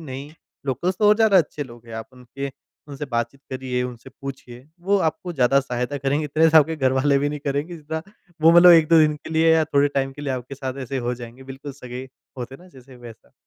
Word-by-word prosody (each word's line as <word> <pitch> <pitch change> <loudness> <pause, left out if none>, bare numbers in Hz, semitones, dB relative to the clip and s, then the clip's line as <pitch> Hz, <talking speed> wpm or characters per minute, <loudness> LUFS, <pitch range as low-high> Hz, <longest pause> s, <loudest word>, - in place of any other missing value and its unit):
नहीं 140 -1 -8 0.4
लोकल्स 175 +8 -1
तो 210 -1 +4
और 210 - +7
ज़्यादा 215 -3 +5
अच्छे 150 -2 -1
लोग 120 -2 -14
हैं। 115 - -9
आप - - -25
उनके 130 +2 -7 0.4
उनसे 145 +1 -6
बातचीत 120 +3 -2
करिये 130 -1 -2
उनसे 125 -1 -7
पूछिए, 130 -2 -9
वो 200 +3 +2
आपको 160 +3 -2
ज़्यादा 135 -1 +3
सहायता। 125 +2 -3 0.2
इतने 155 +2 +2
से 160 - +5
आपके 160 +1 +5
घर 130 -3 +1
वाले 140 +1 +3
नहीं 150 - -4
करेंगे 145 +5 -2
जितना 160 +1 -5 0.4
वो 165 - +8
मतलब 175 +1 +9
1-2 165 -1 +6
दिन 155 -1 +4
के 155 - -11
लिए, 160 +1 +4
या 160 - +3
थोड़े 145 -2 +2
टाइम 135 0 0
के 145 - -10
लिए 135 -2 -2
आपके 130 +2 -6
साथ 130 -1 -5
ऐसे 135 +1 -4
हो 125 - -1
जायेंगे, 120 +1 -11
बिल्कुल 135 +2 -8
सगे 125 -2 -8 0.4
होते 125 +2 -6
न 185 - -16
जैसे 130 0 -15
वैसा। 120 -2 -14
140 Hz, 220 wpm, -22 LUFS, 125-155 Hz, 0.4 s, मतलब